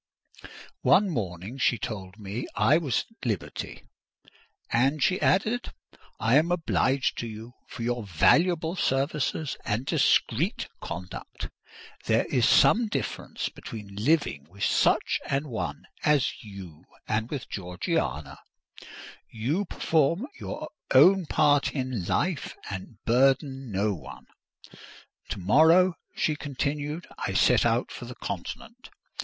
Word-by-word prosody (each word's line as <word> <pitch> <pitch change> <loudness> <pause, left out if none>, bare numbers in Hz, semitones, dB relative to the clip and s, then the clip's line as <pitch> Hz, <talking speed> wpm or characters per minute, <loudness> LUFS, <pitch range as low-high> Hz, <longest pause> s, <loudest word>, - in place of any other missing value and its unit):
One 195 0 +4
morning 100 - -4
she 120 -1 +3
told 95 -3 -6
me 105 +3 -5
I 155 +4 +4
was 140 -8 -1
at 225 - -24
liberty. 110 -8 -4 0.9
"And," 135 +5 +2
she 185 - +2
added, 220 +6 +1 0.5
"I 115 +5 +4
am 165 +3 +2
obliged 140 -6 +1
to 120 - -3
you 110 +2 -9
for 120 - -7
your 120 0 -1
valuable 160 - +3
services 140 0 0
and 115 +4 -1
discreet - - +2
conduct! 90 +2 -7 0.6
There - - +3
is 120 -3 +3
some 235 0 +5
difference 210 - -3
between 105 -3 -9
living 105 - +1
with 100 +3 -8
such - - +2
an 140 +2 -1
one 115 - -4 0.2
as 150 -4 +3
you 95 -7 -11 0.2
and 110 +2 -1
with 140 -5 -5
Georgiana: 85 - -3 0.9
you 140 - -1
perform 165 - +1
your - - -6 0.3
own 180 +6 +7
part 145 -2 +3
in 130 -8 -2
life 175 -5 -1 0.2
and 95 +3 -7
burden 135 +1 +2
no 100 +2 +1
one. 85 - -10 1.0
To - - -3
morrow," 160 - +5 0.2
she 155 - +1
continued, 145 +3 -3
"I - - -2
set - - +4
out - - 0
for - - -7
the - - -8
Continent. 230 +2 -7
130 Hz, 125 wpm, -27 LUFS, 105-155 Hz, 1.0 s, own